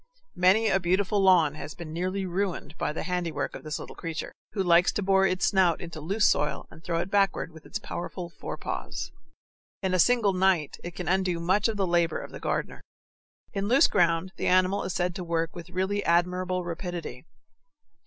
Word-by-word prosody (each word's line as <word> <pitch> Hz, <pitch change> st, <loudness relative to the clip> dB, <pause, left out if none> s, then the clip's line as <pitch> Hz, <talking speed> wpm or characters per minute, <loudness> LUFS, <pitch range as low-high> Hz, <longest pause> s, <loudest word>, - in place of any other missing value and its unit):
Many 190 Hz, +5 st, +4 dB
a 190 Hz, -, +3 dB
beautiful 190 Hz, +3 st, +1 dB
lawn 180 Hz, -6 st, +5 dB
has 155 Hz, 0 st, -8 dB
been 165 Hz, -3 st, -8 dB
nearly 185 Hz, +3 st, -2 dB
ruined 185 Hz, -2 st, -3 dB
by -, -, 0 dB
the 150 Hz, -, -4 dB
handiwork 180 Hz, -3 st, -2 dB
of -, -, -8 dB
this 155 Hz, 0 st, -3 dB
little -, -, -9 dB
creature, 165 Hz, -2 st, -5 dB, 0.2 s
who 195 Hz, -, 0 dB
likes 175 Hz, 0 st, +5 dB
to 205 Hz, -, -1 dB
bore 195 Hz, 0 st, +4 dB
its 185 Hz, 0 st, 0 dB
snout 185 Hz, -5 st, +3 dB
into 165 Hz, -3 st, -7 dB
loose 200 Hz, +7 st, +1 dB
soil 150 Hz, -, 0 dB
and 160 Hz, -, -14 dB
throw 170 Hz, -1 st, -1 dB
it 175 Hz, +3 st, -6 dB
backward 195 Hz, -4 st, +1 dB
with 160 Hz, 0 st, -14 dB
its 215 Hz, -, -3 dB
powerful 180 Hz, -3 st, -6 dB
forepaws. 170 Hz, -, -5 dB, 0.7 s
In 190 Hz, -1 st, 0 dB
a 185 Hz, -, +2 dB
single 225 Hz, 0 st, +4 dB
night 185 Hz, -5 st, +1 dB
it 175 Hz, 0 st, -7 dB
can 180 Hz, -, -5 dB
undo 185 Hz, -1 st, +1 dB
much 190 Hz, +6 st, +2 dB
of 220 Hz, -2 st, -2 dB
the 195 Hz, -, +1 dB
labor 170 Hz, -1 st, +2 dB
of -, -, -9 dB
the -, -, -8 dB
gardener. -, -, -3 dB, 0.7 s
In 200 Hz, -1 st, -1 dB
loose 270 Hz, +7 st, +6 dB
ground 170 Hz, 0 st, +2 dB
the -, -, -1 dB
animal 185 Hz, +2 st, +3 dB
is 185 Hz, -, -2 dB
said 180 Hz, 0 st, 0 dB
to 180 Hz, -, -5 dB
work 165 Hz, -1 st, -1 dB
with 175 Hz, 0 st, -9 dB
really 190 Hz, +3 st, -1 dB
admirable 180 Hz, +1 st, +1 dB
rapidity. 170 Hz, -6 st, -5 dB
180 Hz, 195 wpm, -27 LUFS, 170-190 Hz, 0.7 s, loose